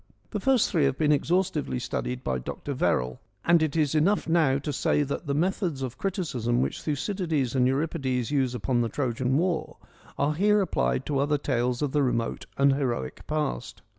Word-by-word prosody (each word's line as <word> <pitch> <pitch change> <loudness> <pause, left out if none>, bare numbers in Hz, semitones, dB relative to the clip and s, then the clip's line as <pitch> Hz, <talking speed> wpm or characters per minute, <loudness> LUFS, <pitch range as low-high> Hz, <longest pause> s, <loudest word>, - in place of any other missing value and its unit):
The - - -2
first 265 -4 +3
three 160 -6 +3
have 135 -1 +1
been 150 -1 +2
exhaustively 170 -1 +1
studied 125 +1 -3
by 65 - -1
Dr. 140 - -5
Verrall, 65 - 0 0.3
and 170 -1 +5
it 155 -2 0
is 155 -3 +2
enough 170 +7 +2
now 160 -5 +3
to 145 +1 -4
say 145 +2 +2
that 140 +3 -4
the 140 - 0
methods 170 -3 0
of 130 -1 -5
criticism 135 - -1
which 130 - -1
Thucydides 155 - -1
and 125 -2 +3
Euripides 135 -3 -1
use 130 -4 +1
upon 125 0 0
the 115 - 0
Trojan 130 0 0
War, 175 0 -1 0.4
are 145 +2 +1
here 210 +6 +3
applied 65 - 0
to 140 -2 0
other 145 +1 +2
tales 125 -2 -1
of 145 - 0
the 150 - +2
remote 120 -3 -1
and 140 0 +5
heroic 125 - -3
past. 150 - -3
140 Hz, 185 wpm, -27 LUFS, 125-160 Hz, 0.4 s, and